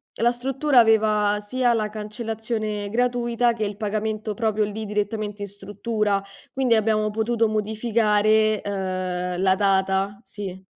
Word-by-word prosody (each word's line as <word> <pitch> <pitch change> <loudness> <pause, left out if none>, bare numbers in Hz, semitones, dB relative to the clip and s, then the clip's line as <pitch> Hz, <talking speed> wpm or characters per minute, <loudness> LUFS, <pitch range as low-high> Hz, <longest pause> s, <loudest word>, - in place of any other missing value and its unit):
la 235 +2 +2
struttura 270 +2 +2
aveva 215 -2 +4
sia 240 +4 +1
la 215 -2 0
cancellazione 215 -1 -4
gratuita 240 0 +1
che 220 - -3
il 205 -1 -3
pagamento 215 0 -2
proprio 215 -1 0
lì 215 +1 -5
direttamente 210 0 -3
in - - -4
struttura, 205 +1 -2 0.3
quindi 260 -3 +2
abbiamo 215 -1 +2
potuto 225 +1 +1
modificare, 215 0 +2
ehm, 185 -2 -3
la 190 0 +4
data. 195 0 +1
Sì, 190 -4 -7
215 Hz, 130 wpm, -23 LUFS, 205-225 Hz, 0.3 s, aveva